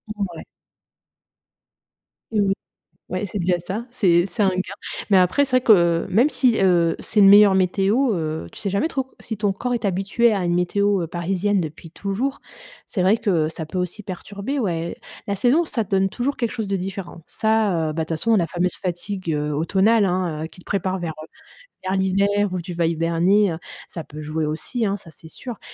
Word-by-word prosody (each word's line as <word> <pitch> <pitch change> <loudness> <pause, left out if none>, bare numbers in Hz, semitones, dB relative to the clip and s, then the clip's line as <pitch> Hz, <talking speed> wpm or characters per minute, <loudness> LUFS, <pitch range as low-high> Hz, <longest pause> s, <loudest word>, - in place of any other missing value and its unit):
Mouais. 190 -6 -5 1.9
Oui, 205 -3 +2 0.6
ouais 185 +3 -2
c'est 200 +1 -5
déjà 175 0 +1
ça, 195 +7 -5
c'est 175 -8 +3
c'est 195 +3 -1
un 195 - +4
gain. 185 +1 -3 0.4
Mais 195 - +6
après, 185 +11 +3
c'est 270 - -10
vrai - - +1
que 170 -7 +4
même 235 +10 +4
si, 250 -6 +2
heu, 175 -3 +3
c'est 210 - +1
une 195 - +8
meilleure 200 -1 +8
météo, 195 +7 +2
heu, 155 - -3
tu - - -11
sais 200 - -2
jamais 200 - 0
trop 270 -5 -1
co 265 - -29
si 220 - -5
ton 205 -1 +1
corps 245 +5 -3
est 230 -4 -2
habitué 200 +5 +2
à 195 - -1
une 175 0 +1
météo, 200 +2 +1
heu, - - -4
parisienne 185 +4 0
depuis 160 +1 -7
toujours. 205 +10 -3 0.5
C'est 190 - -2
vrai 195 +5 +4
que 175 -9 +1
ça 160 0 -6
peut 185 - -6
aussi 180 +4 -3
perturber 200 +8 -5
ouais. 170 -7 -2 0.3
La 200 - -1
saison, 250 - +3
ça 235 -9 -2
te 205 - -26
donne 195 0 +2
toujours 255 +7 -2
quelque 235 -2 -2
chose 220 -4 -4
de 195 - 0
différent. 185 -2 -6
Ça, 210 -7 +1
heu, 155 - -3
bah 160 - -2
toute 160 - -10
façon, 225 +7 +2
la 170 -5 +2
fameuse 180 +1 -1
fatigue, 185 0 -4
heu, 150 0 -1
automnale, 195 +8 +3
hein, 175 -4 -1
heu, - - -4
qui 180 - -17
te - - -17
prépare 190 -1 -1
vers, 170 -2 -4
heu, - - -12 0.6
vers 190 - 0
l'hiver 200 +1 +1
où 185 - -2
tu 175 +1 -7
vas 170 -1 0
hiberner, 170 +4 +2
heu, 160 - -5 0.3
ça 165 - -6
peut 155 0 -10
jouer 155 +1 -2
aussi, 210 +9 -2
hein, 200 - 0
ça, 185 -4 -13
c'est 160 - -13
sûr. 240 +7 -8
190 Hz, 210 wpm, -22 LUFS, 170-210 Hz, 1.9 s, une